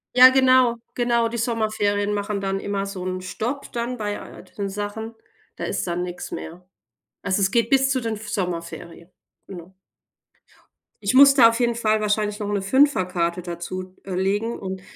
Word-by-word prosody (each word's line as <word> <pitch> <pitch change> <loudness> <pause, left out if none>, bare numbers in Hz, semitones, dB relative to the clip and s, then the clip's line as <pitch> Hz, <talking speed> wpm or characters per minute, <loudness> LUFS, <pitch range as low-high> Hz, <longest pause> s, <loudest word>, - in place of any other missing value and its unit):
Ja, 255 +1 +10
genau. 255 -2 +4 0.2
Genau, 235 -1 +1
die 235 - -5
Sommerferien 215 -3 0
machen 205 0 -2
dann 195 0 -2
immer 200 0 -3
so 195 -2 -6
'n 185 0 -3
Stopp 235 +9 -4
dann 240 +1 -3
bei 205 -2 -3
all - - -11
den 200 -1 -6
Sachen, 205 +3 -5 0.4
da - - -7
ist - - -2
dann 175 +1 -2
nichts 180 0 -7
mehr. 175 +3 -8 0.6
Also, 195 +1 0
es 190 - +3
geht 230 +2 +2
bis 270 0 +3
zu 265 -1 +1
den 225 -2 -2
F 215 +1 -9
Sommerferien. 170 -1 -5 0.4
Genau. 180 -1 -11 1.3
Ich 200 - 0
muss 275 +1 +9
da 245 -4 +7
auf 230 +1 -3
jeden 240 -1 +2
Fall 220 -2 +1
wahrscheinlich 210 0 0
noch 210 -1 -4
'ne 205 -1 -1
5er 265 0 +3
Karte 175 -1 -2
dazu, 185 +2 -6
äh, 190 - -6
legen 200 +5 -1
und 190 -1 -6
205 Hz, 180 wpm, -23 LUFS, 185-235 Hz, 1.3 s, Ja